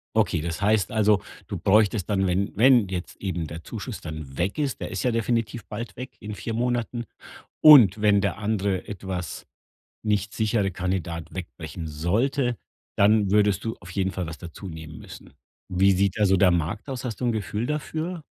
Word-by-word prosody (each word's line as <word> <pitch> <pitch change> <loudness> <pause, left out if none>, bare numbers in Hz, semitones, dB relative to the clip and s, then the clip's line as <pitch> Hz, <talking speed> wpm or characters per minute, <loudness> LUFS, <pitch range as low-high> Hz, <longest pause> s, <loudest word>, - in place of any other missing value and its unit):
Okay, 95 -7 +2
das 85 +4 -4
heißt 105 -2 +2
also, 105 -2 +3 0.2
du - - -4
bräuchtest 105 -1 +3
dann, 95 -2 +1
wenn 95 +3 0
wenn 120 -2 +5
jetzt 90 -1 -6
eben 90 -5 -3
der 80 +2 -8
Zuschuss - - -6
dann 75 -4 -8
weg 95 - -1
ist 140 -3 -1
der - - -5
ist - - -3
ja 125 - +2
definitiv 115 -1 -1
bald 115 +3 -6
weg, 125 +1 -7
in 105 0 -6
4 115 - -5
Monaten, 120 0 -1 0.6
und 115 - +9
wenn 100 -2 +4
der 100 +1 -1
andere 100 -3 -1
etwas 95 -3 -5 0.6
nicht 105 -1 0
sichere 105 -3 +1
Kandidat 85 -3 -3
wegbrechen 85 -3 -7
sollte, 115 - 0 0.4
dann 100 -1 +4
würdest 105 -1 +3
du 115 - -3
auf 90 - -12
jeden 95 0 0
Fall 90 -2 -4
was 80 -1 -7
dazunehmen 80 -3 -9
müssen. - - -12 0.4
Wie 95 +2 +4
sieht 100 +2 +1
da 105 - +4
so 95 0 +4
der 90 0 +5
Markt 85 - -1
aus? 130 -1 -5
Hast 120 -1 -4
du - - -1
'n 120 - +2
Gefühl 110 +1 -2
dafür? 155 +4 -3
100 Hz, 185 wpm, -25 LUFS, 90-110 Hz, 0.6 s, und